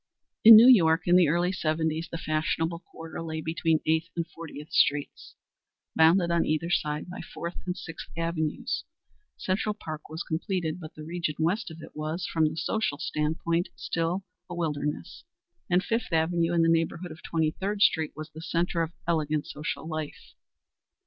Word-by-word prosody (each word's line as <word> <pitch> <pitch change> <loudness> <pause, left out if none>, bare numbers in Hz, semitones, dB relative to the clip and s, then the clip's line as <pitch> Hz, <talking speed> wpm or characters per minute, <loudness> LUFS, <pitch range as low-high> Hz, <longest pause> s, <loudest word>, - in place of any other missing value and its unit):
In 225 0 +12
New 225 +3 +9
York 165 -9 +6
in 175 - +4
the 180 -3 +6
early 175 +4 +2
seventies 160 -2 -1
the 165 - -3
fashionable 165 +1 -1
quarter 165 -1 -9
lay 160 -1 -4
between 160 0 0
Eighth 160 +1 +1
and 170 -1 -1
Fortieth 160 -2 -10
Streets, 145 0 +1 0.6
bounded 170 +2 +5
on 170 -1 +3
either 155 +2 -1
side 150 -1 0
by 180 - -7
Fourth 170 +1 -6
and 180 - -2
Sixth 165 - -8
Avenues. 165 -2 -2 0.5
Central 205 +3 -1
Park 155 -7 -8
was 160 +2 -5
completed, 170 0 -2
but 155 -3 -10
the 155 - -9
region 165 -1 -3
west 175 +8 0
of 160 0 -10
it - - -12
was, 155 +4 -3
from 160 -2 +1
the 155 - -8
social 215 -6 -1
stand 150 +2 -1
point, 170 +1 +1
still 170 +3 -2 0.3
a 175 - -5
wilderness, 150 - -3 0.5
and 180 +2 +3
Fifth 230 -3 -2
Avenue 165 +1 +2
in 170 -1 +3
the - - +3
neighborhood 165 +1 0
of 155 - -11
Twenty 160 -2 0
third 200 +4 -1
Street 160 -2 +2
was 155 0 -8
the 160 - -10
centre 170 +1 0
of 165 0 -2
elegant 155 -3 0
social 150 +1 -5
life. 155 -2 -6
165 Hz, 175 wpm, -27 LUFS, 155-175 Hz, 0.6 s, In